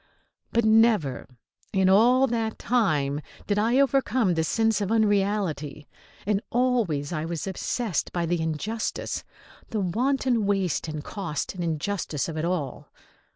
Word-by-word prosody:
But 235 -1 +2
never 220 - +3 0.4
in 190 -2 +2
all 240 +7 +5
that 225 -3 -2
time 150 - +1 0.2
did 205 0 0
I 235 +5 +3
overcome 260 -7 +2
the 160 -1 +1
sense 225 +5 +1
of 200 +1 -1
unreality, 200 -9 0 0.4
and 205 0 +1
always 225 - 0
I 155 -1 -2
was 165 +2 -4
obsessed 195 - -2
by 175 -1 -1
the 170 0 0
injustice, 180 +8 -3 0.5
the 220 - -2
wanton 240 +3 +1
waste 195 -5 0
and 155 -1 -5
cost 190 -6 -4
and 180 -2 -4
injustice 160 -2 -2
of 165 - -5
it 160 +1 -2
all. 165 -7 -3
200 Hz, 140 wpm, -26 LUFS, 160-225 Hz, 0.5 s, all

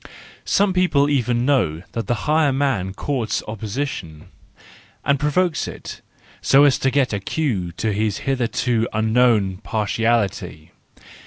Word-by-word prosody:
Some 200 -1 +2
people 150 -6 +2
even 125 -3 +1
know 90 - +1
that 115 - -4
the 120 - +1
higher 155 -1 +3
man 130 -9 0
courts 120 +2 -2
opposition, 110 - -5 0.8
and 140 -1 +2
provokes 155 +3 0
it, - - -9 0.4
so 140 +1 +5
as 145 -2 +4
to 135 - +2
get 135 -3 +1
a 100 - -1
cue 100 - -2
to 110 +4 -2
his 105 0 -1
hitherto 120 -3 0
unknown 110 -3 +2
parti¬ 105 +1 -2
ality. 105 -8 -1
120 Hz, 135 wpm, -21 LUFS, 105-140 Hz, 0.8 s, so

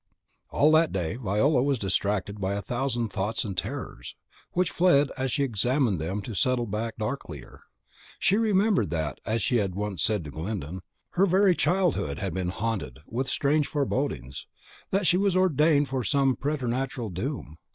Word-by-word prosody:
All 150 +2 +4
that 160 0 +4
day 90 +3 -2
Viola 125 +5 +2
was 140 0 +1
distracted 100 0 -1
by 95 +1 0
a 100 - -2
thousand 120 -2 -1
thoughts 105 +3 -2
and 100 -3 -4
terrors, 65 -8 -5 0.4
which 180 -1 +1
fled 170 -5 +4
as 130 -2 -2
she 140 - +1
examined 120 - +1
them 95 +6 -3
to 115 - -6
settle 125 +4 +1
back 110 +2 -3
the 110 - -2
darklier. 90 - -6 0.6
She 195 - +2
remembered 210 - +2
that, 80 -5 -2
as 110 +1 0
she 125 - +2
had 95 -5 -1
once 105 -2 -3
said 105 -5 +1
to 75 - -8
Glyndon, 90 +1 -5 0.3
her 195 +3 +3
very 190 0 +4
childhood 175 - +1
had 95 -3 -3
been 95 -1 -2
haunted 100 - -3
with 130 +7 -3
strange 145 +1 +2
forebodings, 135 - -2 0.4
that 195 0 +1
she 180 - +4
was 195 -1 +2
ordained 155 -5 +3
for 130 -1 -2
some 135 0 +2
preternatural 130 -4 -2
doom. 85 - -5
120 Hz, 170 wpm, -27 LUFS, 95-145 Hz, 0.6 s, All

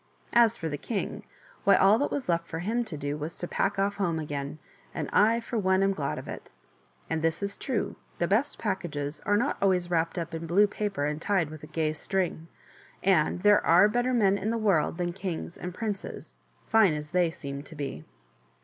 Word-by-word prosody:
As 235 -1 +5
for 165 - -3
the 145 -2 -4
king 215 -5 -3 0.2
— - - -26
why, 200 - +6
all 200 +4 +5
that 285 - +1
was 280 - -3
left 170 -1 0
for 165 - -5
him 220 +8 0
to 170 -9 -6
do 145 +1 -3
was 155 +3 -5
to 175 - -4
pack 195 +3 0
off 200 +1 0
home 175 -5 0
again; 145 -1 -4 0.4
and - - -2
I, 225 +3 +5
for 235 0 -3
one, 190 -1 +3
am 195 0 +3
glad 145 -6 -3
of - - -7
it. - - -8 0.6
And 160 - -1
this 165 +4 0
is 200 0 -2
true; 255 -5 -2 0.2
the 175 - +1
best 225 +10 +1
packages 160 -8 -3
are 205 0 +4
not 250 +7 0
always 180 -3 +2
wrapped 165 +1 0
up 170 0 -4
in 165 0 -4
blue 195 +5 +5
paper 205 -6 -2
and 150 +1 -2
tied 180 -6 +1
with 155 -1 -9
a 150 - -10
gay 155 -1 -1
string, 170 0 -2 0.6
and 180 -1 +2
there 205 0 +6
are 180 +5 +6
better 245 +4 0
men 200 -5 +3
in 210 - -2
the 230 - 0
world 195 -7 +2
than 175 -1 -1
kings 180 -3 -5
and 180 - -6
princes, 205 +1 -5 0.3
fine 220 -7 +5
as 150 0 -6
they 180 -2 +3
seem 140 -4 -6
to 155 +3 -12
be. 135 - -5
180 Hz, 215 wpm, -28 LUFS, 160-205 Hz, 0.6 s, why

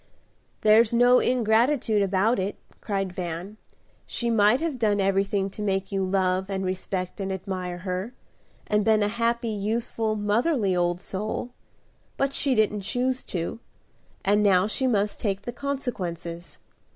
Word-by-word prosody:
"There's 220 +1 +5
no 245 +1 +5
ingratitude 230 -1 +2
about 200 +4 +2
it," 190 +2 -2 0.3
cried 195 -3 -2
Van. 180 +3 -5 0.5
"She 235 -1 -1
might 215 +2 +4
have 315 -5 -2
done 210 -3 +2
everything 195 0 +1
to 210 - -7
make 195 -1 -1
you 195 -1 0
love, 190 0 0
and 190 -1 -2
respect, 185 0 -3
and 195 -1 -2
admire 185 -1 -4
her, 185 +6 -4 0.5
and 210 0 +1
been 215 0 +3
a - - +2
happy, 235 +2 0
useful, 220 +1 -1
motherly, 210 - +1
old 175 0 0
soul; 215 +6 -4 0.7
but 275 0 0
she 275 -2 +1
didn't 210 -2 +2
choose 250 +5 -1
to, 175 +5 -4 0.7
and 205 +1 +3
now 190 -3 +4
she 260 +5 0
must 210 -4 0
take 200 -2 -2
the 240 - -5
consequences. 185 -11 -4
205 Hz, 145 wpm, -25 LUFS, 190-230 Hz, 0.7 s, There's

